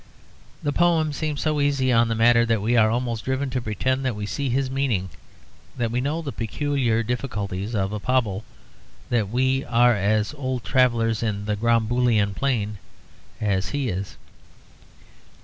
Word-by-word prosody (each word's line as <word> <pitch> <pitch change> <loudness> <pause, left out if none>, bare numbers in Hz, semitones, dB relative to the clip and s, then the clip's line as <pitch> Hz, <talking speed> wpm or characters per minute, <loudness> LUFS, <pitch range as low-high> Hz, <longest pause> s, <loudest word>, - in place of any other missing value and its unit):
The 145 - 0
poet 165 -3 +2
seems 150 -1 -3
so 155 -2 0
easy 140 -3 +2
on 115 0 +4
the 115 - -1
matter 115 +1 +5
that 115 -1 +2
we 115 +4 +1
are 110 -2 +5
almost 120 -1 -2
driven 130 +1 -2
to 125 0 -1
pretend 130 +5 -1
that 130 -4 -1
we 105 0 -4
see 140 +5 -2
his 130 +2 0
meaning, 120 -10 -1 0.7
that 115 -2 -1
we 125 +1 0
know 155 +5 -2
the 140 - -4
peculiar 120 -1 -1
difficulties 105 -4 -3
of 95 0 -1
a 105 - -3
Pobble, 110 -4 0 0.7
that 110 -5 +1
we 130 +3 +1
are 120 0 +4
as 105 +4 +1
old 130 -4 -3
travellers 115 -4 +2
in 105 -3 -2
the 105 0 0
'Gromboolian 115 -1 +2
Plain' 105 -4 -1 0.6
as 100 -3 0
he 140 -4 -1
is. 95 -2 -5
120 Hz, 165 wpm, -24 LUFS, 105-130 Hz, 0.7 s, matter